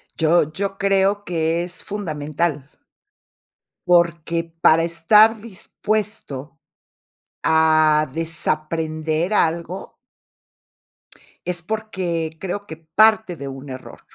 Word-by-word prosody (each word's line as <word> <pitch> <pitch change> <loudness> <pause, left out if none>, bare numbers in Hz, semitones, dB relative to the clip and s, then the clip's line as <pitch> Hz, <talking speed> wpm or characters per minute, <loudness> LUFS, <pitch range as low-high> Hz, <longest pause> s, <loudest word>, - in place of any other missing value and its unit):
Yo 160 -1 +2
yo 195 +4 -3
creo 195 +1 +2
que 165 0 0
es 180 0 -6
fundamental. 155 -6 -3 1.2
Porque 170 -1 +2
para 165 -1 +3
estar 210 +7 +5
dispuesto 205 - -4 0.8
a 155 -1 +4
desaprender 160 +2 -1
algo 170 +1 -1 1.5
es 175 -1 -2
porque 175 -6 -3
creo 195 +2 -4
que 160 - -8
parte 210 +4 +3
de 140 -3 -7
un 135 +1 -8
error. 130 0 -9
165 Hz, 90 wpm, -21 LUFS, 155-195 Hz, 1.5 s, estar